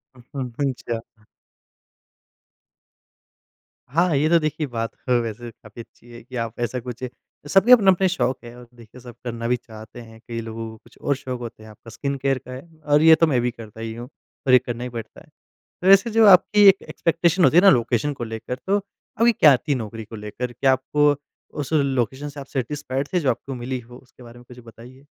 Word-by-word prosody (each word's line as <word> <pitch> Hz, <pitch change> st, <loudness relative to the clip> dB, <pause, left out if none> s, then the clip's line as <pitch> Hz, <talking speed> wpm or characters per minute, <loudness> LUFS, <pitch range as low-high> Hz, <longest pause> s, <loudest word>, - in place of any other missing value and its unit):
उम्म, 130 Hz, +2 st, -7 dB
हुँ। 140 Hz, -1 st, +1 dB
अच्छा। 115 Hz, -3 st, -7 dB, 2.7 s
हाँ, 165 Hz, +3 st, +2 dB
ये 145 Hz, +3 st, +2 dB
तो 170 Hz, 0 st, +5 dB
देखिए 155 Hz, -1 st, -2 dB
बात 115 Hz, -2 st, -4 dB, 0.2 s
ह -, -, +1 dB
वैसे 115 Hz, +1 st, -6 dB
काफ़ी 110 Hz, +1 st, -13 dB
अच्छी 120 Hz, +1 st, -18 dB
है 120 Hz, -, -11 dB
कि 125 Hz, +2 st, -12 dB
आप 115 Hz, -1 st, -4 dB
ऐसा 120 Hz, +1 st, -2 dB
कुछ 125 Hz, 0 st, -8 dB, 0.4 s
सबके 195 Hz, +9 st, +4 dB
अपने-अपने 195 Hz, -6 st, +6 dB
शौक 135 Hz, -8 st, -1 dB
हैं 120 Hz, 0 st, -11 dB
और 125 Hz, 0 st, -13 dB
देखिए 120 Hz, +1 st, -15 dB
सब 120 Hz, -1 st, -12 dB
करना 115 Hz, -1 st, -4 dB
भी 125 Hz, -, +2 dB
चाहते 110 Hz, +1 st, -12 dB
हैं। 115 Hz, -1 st, -14 dB
कई 115 Hz, -1 st, -4 dB
लोगों 115 Hz, 0 st, -6 dB
को 110 Hz, -, -13 dB
कुछ 120 Hz, -, -21 dB
और 140 Hz, -, 0 dB
शौक 130 Hz, -2 st, -6 dB
होते 115 Hz, -2 st, -9 dB
हैं। 110 Hz, -, -13 dB
आपका 110 Hz, +2 st, -15 dB
स्किन 140 Hz, +4 st, -4 dB
केयर 135 Hz, 0 st, 0 dB
का -, -, -8 dB
है 130 Hz, +1 st, -7 dB, 0.3 s
और 145 Hz, -, +6 dB
ये 160 Hz, 0 st, +8 dB
तो 165 Hz, -, +3 dB
मैं 135 Hz, -5 st, +1 dB
भी 125 Hz, 0 st, -1 dB
करता 110 Hz, -2 st, -12 dB
ही 115 Hz, 0 st, -5 dB
हूँ 120 Hz, +2 st, -8 dB, 0.4 s
और 130 Hz, -, +4 dB
ये 125 Hz, -, +8 dB
करना 120 Hz, -1 st, -6 dB
ही 125 Hz, -, -4 dB
पड़ता 115 Hz, -2 st, -9 dB
है। -, -, -19 dB, 0.6 s
तो 185 Hz, -, +1 dB
वैसे 195 Hz, +4 st, +6 dB
जो 225 Hz, 0 st, +5 dB
आपकी 205 Hz, +2 st, +6 dB
एक 195 Hz, 0 st, +5 dB
एक्सपेक्टेशन 170 Hz, +1 st, +1 dB
होती 165 Hz, -, +4 dB
है 175 Hz, -, +7 dB
ना, 200 Hz, -, +7 dB
लोकेशन 120 Hz, 0 st, +1 dB
को 125 Hz, -4 st, -6 dB
लेकर 115 Hz, +2 st, -5 dB
तो 200 Hz, -, +2 dB
आपकी 210 Hz, +3 st, -1 dB
क्या 150 Hz, -, +6 dB
थी 145 Hz, +3 st, -2 dB
नौकरी 115 Hz, -2 st, -6 dB
को 115 Hz, +1 st, -10 dB
लेकर 110 Hz, +4 st, -6 dB
क्या 135 Hz, +3 st, +2 dB
आपको 145 Hz, +3 st, +2 dB, 0.5 s
उस 145 Hz, +1 st, -5 dB
लोकेशन 135 Hz, -2 st, 0 dB
से 145 Hz, 0 st, -9 dB
आप 135 Hz, -, -9 dB
सैटिस्फाइड 135 Hz, 0 st, -4 dB
थे 180 Hz, -, +2 dB
जो 140 Hz, -5 st, +1 dB
आपको 135 Hz, +3 st, -5 dB
मिली 125 Hz, +1 st, -4 dB
हो? 120 Hz, +1 st, -15 dB
उसके 125 Hz, 0 st, -19 dB
बारे 120 Hz, 0 st, -13 dB
में 120 Hz, -, -16 dB
कुछ 125 Hz, -, -13 dB
बताइए? 120 Hz, +4 st, -15 dB
125 Hz, 215 wpm, -22 LUFS, 115-150 Hz, 2.7 s, ये